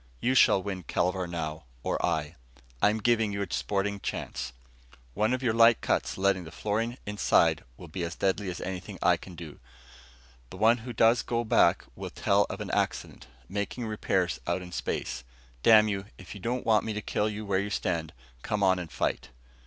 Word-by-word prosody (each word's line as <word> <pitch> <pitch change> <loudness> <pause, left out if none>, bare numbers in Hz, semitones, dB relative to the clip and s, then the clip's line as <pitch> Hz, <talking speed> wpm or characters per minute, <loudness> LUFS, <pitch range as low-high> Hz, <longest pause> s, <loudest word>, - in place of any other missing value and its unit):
You 130 - +1
shall 100 -7 +5
win 95 -2 -4
Kelvar 90 +1 -1
now, 80 -3 -4 0.2
or - - -1
I. 75 -2 -1 0.5
I'm 105 +1 +4
giving 110 -1 +2
you 100 0 -2
a - - -5
sporting 100 0 -1
chance. 60 -8 -4 0.6
One 110 - +1
of 130 +1 -1
your 120 -3 +2
light 115 0 +6
cuts - - -1
letting 95 -1 +2
the 80 - -9
fluorine 110 +7 -2
inside 105 -1 +2
will 90 - -10
be 85 +3 -6
as 85 - -4
deadly 100 0 0
as 90 - -5
anything 90 -1 -5
I - - +5
can 90 - -11
do. 80 -3 -9 0.9
The - - -10
one 115 +4 +5
who 120 +3 -7
goes 115 +2 +4 0.2
back 110 -6 +4
will - - -6
tell - - +2
of - - -5
an - - -4
accident, - - -2 0.2
making 100 +5 -3
repairs 95 -8 0
out 90 - -1
in 90 - -10
space. 65 -6 -3 0.4
Damn 110 - +7
you, 100 -2 -2
if 90 -5 -10
you 100 - -10
don't 120 +4 -2
want 110 -2 +4
me 110 - -3
to 105 - -3
kill 105 +1 0
you 105 0 -5
where 95 -2 +1
you 100 +1 -2
stand, 85 -5 -2 0.3
come 105 - -1
on 95 -1 +4
and 85 -3 -7
fight." - - -2
100 Hz, 190 wpm, -28 LUFS, 90-110 Hz, 0.9 s, Damn